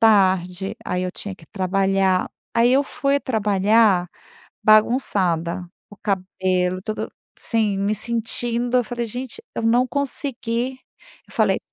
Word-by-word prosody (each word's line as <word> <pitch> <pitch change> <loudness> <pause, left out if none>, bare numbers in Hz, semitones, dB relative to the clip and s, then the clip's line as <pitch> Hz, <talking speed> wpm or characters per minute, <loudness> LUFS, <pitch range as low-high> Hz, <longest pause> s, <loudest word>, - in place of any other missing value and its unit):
tarde, 190 -3 +3
aí 180 0 -1
eu 185 - -3
tinha 200 -2 -5
que 160 - -18
trabalhar. 190 -1 +1 0.2
Aí 235 +1 +4
eu 275 +2 +5
fui 280 0 0
trabalhar 210 -4 +3 0.6
bagunçada, 190 -7 +2 0.2
o 205 - -14
cabelo 185 -2 -1
todo 215 +2 -4 0.3
Sim, 215 -4 0
me 200 +2 +1
sentindo 235 +2 -1
Eu 250 - +3
falei: 240 +1 -3
"Gente 250 - -6
eu - - -3
não 240 +3 +4
consegui". 260 -3 -2 0.5
Eu - - -19
falei"". - - +2
215 Hz, 130 wpm, -22 LUFS, 185-240 Hz, 0.6 s, eu